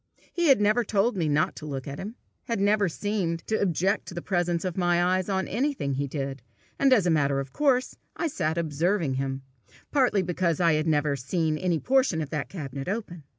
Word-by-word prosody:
He 345 -2 +1
had 270 -5 +6
never 215 +3 +3
told 220 +2 +1
me 165 -5 0
not 150 +1 +1
to 155 - -7
look 135 -2 -5
at 140 +1 -6
him, 215 +4 -6 0.3
had 230 -3 -2
never 205 -1 +3
seemed 175 -3 -2
to 220 - -1
object 190 +1 +1
to - - -8
the 175 - -4
presence 175 -2 0
of 180 -2 -2
my 175 -2 +2
eyes 185 +2 +1
on 190 -1 0
anything 250 - -1
he 140 +2 -1
did, 135 -1 -4 0.4
and 275 - +4
as 220 -8 +5
a 175 - +3
matter 140 -3 +2
of 135 -1 -6
course 265 -4 +1 0.2
I - - -2
sat 170 - -1
observing 165 0 0
him, 135 0 -3 0.5
partly 250 -9 +3
because 175 -2 0
I 170 -2 +4
had 155 +1 0
never 150 -2 +2
seen 155 +4 -1
any 175 +1 0
portion 260 - +2
of 150 -3 -4
that 150 -2 -3
cabinet 140 -6 -6
open. 180 -7 -4
175 Hz, 210 wpm, -26 LUFS, 150-205 Hz, 0.5 s, had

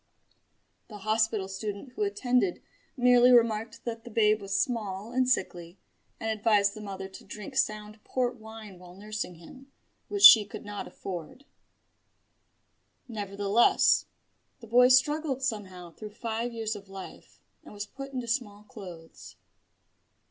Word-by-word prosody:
The 210 - -10
hospital 215 -1 0
student 200 +5 -6
who 425 - -8
attended 250 - 0 0.3
merely 245 0 +5
remarked 230 -2 +2
that 230 -1 -5
the - - -10
babe 215 -1 +2
was 195 0 -1
small 215 -3 -2
and 255 0 +1
sickly, 175 -6 -2 0.4
and 225 - -4
advised 210 -2 +2
the 215 - -9
mother 195 -2 -6
to 190 - -12
drink 210 +6 -9
sound 215 -3 -2
port 250 -1 -2
wine 220 -4 -11
while 180 0 -14
nursing 210 -2 -6
him, 260 +12 -15 0.4
which 405 -1 -3
she 220 - +11
could 200 - -10
not 205 -1 -6
afford. 185 - -8 1.6
Nevertheless, 205 0 +2 0.5
the 235 - -12
boy 245 +3 +5
struggled 270 +1 +2
somehow 190 -8 -4
through 210 +4 -11
five 230 +1 -3
years 225 -1 -3
of 200 -1 -11
life, 195 -1 -11 0.2
and - - -13
was 205 0 -6
put 275 +4 -9
into 255 -2 -4
smallclothes. 205 -7 -7
215 Hz, 135 wpm, -28 LUFS, 200-245 Hz, 1.6 s, she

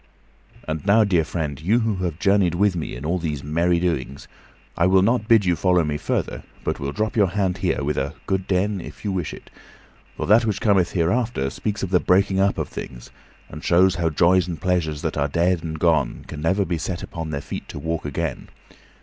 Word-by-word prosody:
And 80 0 -3
now, 105 +3 +5
dear 90 -6 +2
friend, 75 -4 -4
you 110 +9 +2
who 110 -3 0
have 90 -4 -3
journeyed 95 -2 +2
with 100 +1 +2
me 80 - -4
in 65 +4 -7
all 90 +3 0
these 75 -4 -3
merry 85 +4 +1
doings, 70 -6 -2 0.5
I 85 - +3
will 95 0 +4
not 115 +1 +1
bid 115 -4 +5
you 90 -1 +2
follow 90 -1 +2
me 75 -1 -2
further, - - -2 0.2
but - - -2
will 70 0 -3
drop 110 +7 -2
your 105 -4 +4
hand 95 -1 -1
here - - 0
with 75 +1 -1
a 70 +4 -3
"good 95 -1 -1
den," 95 +1 0
if - - -11
you 100 - 0
wish 90 -5 -2
it; - - -12 0.7
for - - -2
that 110 +5 +5
which 105 -3 -1
cometh 100 -6 +2
hereafter 90 - 0
speaks 105 +7 -3
of 95 - -3
the 90 - +4
breaking 95 +2 +2
up 100 0 +2
of - - -2
things, - - -9 0.4
and 75 - -10
shows 90 +2 +4
how 85 -2 0
joys 90 +3 +3
and 85 -4 -5
pleasures 85 -5 -1
that - - -2
are 70 0 +1
dead 85 +3 +1
and 80 -1 -4
gone 80 -6 +1
can 75 - -7
never 95 +5 +1
be 85 -1 -2
set 85 +2 -4
upon 80 -4 -6
their 70 -2 -3
feet - - -7
to - - -7
walk 80 +3 -3
again. 75 0 -4
90 Hz, 220 wpm, -22 LUFS, 80-95 Hz, 0.7 s, now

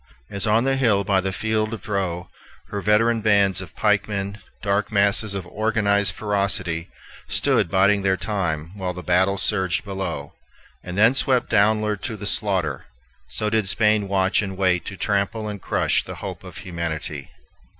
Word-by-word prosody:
As 100 +2 -1
on 110 +2 +3
the 135 0 +1
hill 110 -7 +3
by 95 -1 +2
the 95 +1 -2
field 110 +2 -1
of 110 - -13
Dreux, 95 -6 -2 0.4
her 100 -1 -3
veteran 115 +3 +3
bands 100 -3 +3
of 90 -2 -11
pikemen, 105 -1 0 0.2
dark 100 +2 0
masses 100 0 +2
of 95 -4 -4
organized 100 -1 0
ferocity, 95 -5 -1 0.4
stood - - +1
biding 100 +1 +3
their 95 -1 +1
time 85 -5 -2
while 95 -2 -3
the 90 - -7
battle 95 +2 +2
surged 95 -2 0
below, 95 -3 -4 0.5
and 90 +1 -6
then 110 +4 +6
swept 130 -1 +1
downward 105 -1 +2
to 115 -4 -4
the 105 - -7
slaughter, 95 - -1 0.4
so 65 +12 -3
did 110 -3 +1
Spain 105 -1 +2
watch 95 0 +2
and 95 -2 -5
wait 95 -2 +1
to 95 - -7
trample 105 +1 -1
and 105 -2 -6
crush - - +1
the - - -8
hope - - -7
of - - -10
humanity. 80 -5 -4
100 Hz, 165 wpm, -23 LUFS, 95-105 Hz, 0.5 s, then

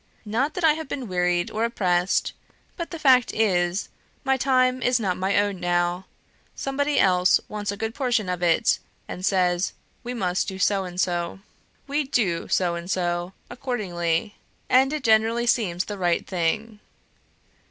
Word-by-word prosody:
Not 255 +8 -1
that 360 - -3
I 315 -2 +6
have 315 -1 -6
been 265 -3 -5
wearied 180 -1 0
or 220 - -1
oppressed; 185 -6 +1 0.4
but 340 -2 -5
the 335 - -6
fact 260 -5 +4
is, 180 -3 +1 0.3
my 270 -1 +2
time 255 -1 +2
is 250 -1 +2
not 190 -5 0
my 190 +2 0
own 205 -2 +1
now; 175 +1 0 0.5
somebody 285 +2 0
else 180 -1 +4
wants 205 -1 -3
a 200 - -6
good 225 +1 -3
portion 245 -7 0
of 180 -1 -3
it, 170 -2 +3 0.3
and 180 - -7
says, 185 -2 +1 0.3
'we 245 +1 -5
must 185 -5 -1
do 190 - -5
so 195 0 +1
and 180 0 -7
so.' 175 0 -1 0.4
We 285 +2 0
DO 200 -10 0
so 180 -2 +1
and 170 +1 -6
so, 175 -1 -1
accordingly; 205 -8 -2 0.3
and 265 +2 +5
it 305 -2 -3
generally 225 +1 +3
seems 190 -7 +1
the 205 -2 -6
right 175 -2 +1
thing. 210 +5 -2
200 Hz, 165 wpm, -24 LUFS, 180-245 Hz, 0.5 s, I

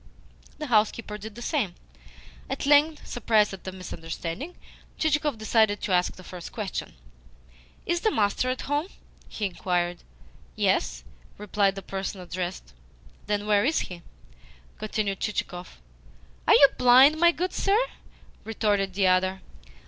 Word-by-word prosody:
The 305 - -5
housekeeper 215 -3 +1
did 215 0 -9
the 240 - -8
same. 230 - -1 0.7
At 270 +1 -3
length, 295 +2 +4
surprised 220 -4 +2
at 195 - -10
the 190 - -4
misunderstanding, 180 - -6 0.4
Chichikov 295 -4 +1
decided 220 -1 +2
to 205 - -3
ask 180 0 +2
the 185 - -13
first 180 -1 -9
question. 210 - -5 0.9
"Is 345 0 0
the 440 - +3
master 215 - +1
at 255 - -2
home?" 290 +4 -1 0.4
he 215 - -3
inquired. 175 -2 -1 0.6
"Yes," - - 0 0.3
replied 200 -1 +1
the 195 - -7
person 195 0 -4
addressed. 180 - -5 0.5
"Then 205 0 -1
were 205 -1 +3
is 310 +5 +2
he?" 175 -2 -7 0.8
continued 210 -2 -2
Chichikov. 180 - -4 0.7
"Are - - +7
you 280 - +8
blind, 260 +5 +7
my 345 0 +6
good 360 +2 -3
sir?" 400 +1 +2 0.7
retorted 205 -3 0
the 195 -1 +2
other. 185 +1 +2
210 Hz, 135 wpm, -26 LUFS, 185-260 Hz, 0.9 s, you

